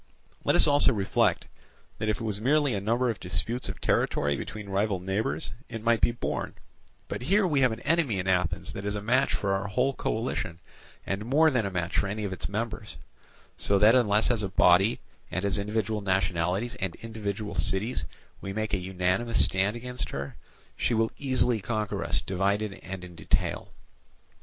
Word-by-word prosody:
Let - - +3
us - - +6
also 145 -2 +5
reflect 100 -3 +1 0.5
that 110 - -1
if 110 - 0
it - - -5
was 105 -2 -2
merely 145 +2 +3
a 100 - -1
number 120 +4 +1
of 110 - -8
disputes 95 +7 -3
of - - -6
territory 70 0 +1
between 105 +7 -6
rival 100 0 0
neighbours, 95 -4 -2 0.2
it 115 -1 -6
might 115 -1 +3
be - - +5
borne; 120 - -3 0.5
but - - -4
here 195 +10 +3
we 150 -6 +2
have 130 -2 +4
an 110 - -5
enemy 150 - +1
in 90 - -2
Athens 90 0 0
that 100 - -6
is 105 0 -2
a 105 - -3
match 130 +5 +2
for 100 -1 0
our 95 +1 -1
whole 125 +7 +1
coalition, 110 -9 -2 0.5
and 95 +2 -2
more 150 +7 +4
than 120 -6 +1
a - - -2
match 85 -2 -2
for 100 - +1
any 105 +2 -3
of 100 -2 -2
its 85 -2 -4
members; 105 0 -4 0.6
so 100 - +2
that 105 +3 +6
unless 110 -3 +4
as 115 -3 +1
a 100 - -2
body 95 +4 +4 0.3
and 95 +2 -2
as 100 0 +1
individual 105 +1 -1
nationalities 95 +3 0
and 95 -5 -3
individual 105 -2 -4
cities 95 - 0 0.4
we 95 - -5
make 110 +1 -2
an 95 - +1
unanimous 95 +5 +1
stand 95 +3 0
against 125 +1 -3
her, 70 0 -5 0.4
she 120 - 0
will 110 0 +2
easily 125 -5 +2
conquer 110 0 -2
us - - 0
divided 100 +2 0
and 95 -1 -7
in 90 -1 -10
detail. 85 - -1
105 Hz, 190 wpm, -28 LUFS, 95-115 Hz, 0.6 s, us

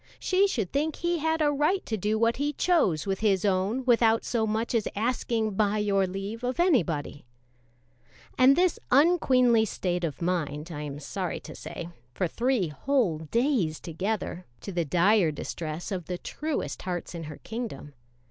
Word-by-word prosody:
She 380 +2 +3
should 220 - -2
think 300 +2 0
he 345 0 -1
had 320 +1 +1
a 295 - +3
right 300 +7 +1
to 220 - -2
do 215 +2 0
what 230 +1 +2
he 290 +2 -1
chose 275 - +2
with 195 -1 -1
his 205 -2 +2
own 200 +6 0
without 230 -2 +4
so 225 -3 0
much 220 +3 -1
as 225 -3 +1
asking 225 0 0
"by 205 +1 +1
your 200 -2 +2
leave" 195 +5 -5
of 250 +6 -2
anybody. 170 - +1 1.1
And 260 +1 +6
this 360 0 +2
unqueenly 255 -6 +4
state 180 -2 -2
of 155 -5 -3
mind 165 -2 -2
lasted, - - -6
I 150 - -5
am 145 -1 -6
sorry 180 +4 -4
to - - -9
say, 170 - -7 0.3
for 180 - 0
three 235 -1 0
whole 190 - 0
days 195 - 0
together, 185 +1 -3
to - - -6
the 175 -2 -1
dire 180 +3 +4
distress 155 +3 -5
of 180 -4 -3
the 180 - -3
truest 305 - -4
hearts 180 -2 -4
in 165 -2 -6
her 150 -1 -8
kingdom. 220 - -6
215 Hz, 175 wpm, -27 LUFS, 175-255 Hz, 1.1 s, And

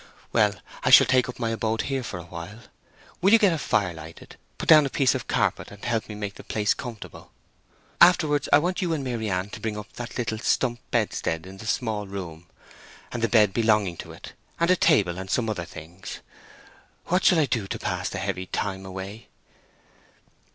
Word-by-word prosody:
Well, 105 -3 +3 0.3
I - - +2
shall - - +9
take 130 -1 +2
up 125 - -7
my 115 -2 -1
abode 115 0 -1
here 135 -1 -2
for 110 -6 -6
a 85 - -8
while. 85 +6 -9 0.6
Will 195 +3 +4
you - - +10
get 205 -6 +4
a 160 - -2
fire 100 -10 0
lighted, 80 0 -11 0.2
put - - -6
down 155 -2 +8
a - - -5
piece 135 -1 +2
of - - -4
carpet, - - 0
and 100 -1 -11
help 115 -2 -1
me 105 - -6
to - - -9
make 100 -1 -4
the - - -12
place 105 -1 0
comfortable. 120 -4 -9 0.7
Afterwards, 155 -5 +5
I - - +8
want 180 +6 -1
you 175 -3 0
and 150 -4 -2
Maryann 105 -6 -2
to - - -7
bring 110 -2 -3
up 105 0 -9
that 120 -1 -7
little 110 -3 -2
stump 120 +1 0
bedstead 80 +1 -1
in 95 +1 -11
the 110 - -9
small 110 -3 -1
room, 90 -4 -7 0.6
and 120 - -4
the 115 - +1
bed 105 -3 +4
belonging 105 -5 +2
to - - -8
it, - - -11 0.3
and 170 +1 +3
a - - +6
table, 100 - +3
and 95 0 -7
some 115 +2 0
other 100 -6 -3
things.... 85 +4 -10 0.8
What 180 +2 +1
shall 180 - +5
I 155 - +4
do 115 -7 -2
to - - -4
pass - - -3
the - - -5
heavy 95 -1 -3
time 95 -1 -3
away?" 95 +4 -8
110 Hz, 205 wpm, -25 LUFS, 95-130 Hz, 0.8 s, you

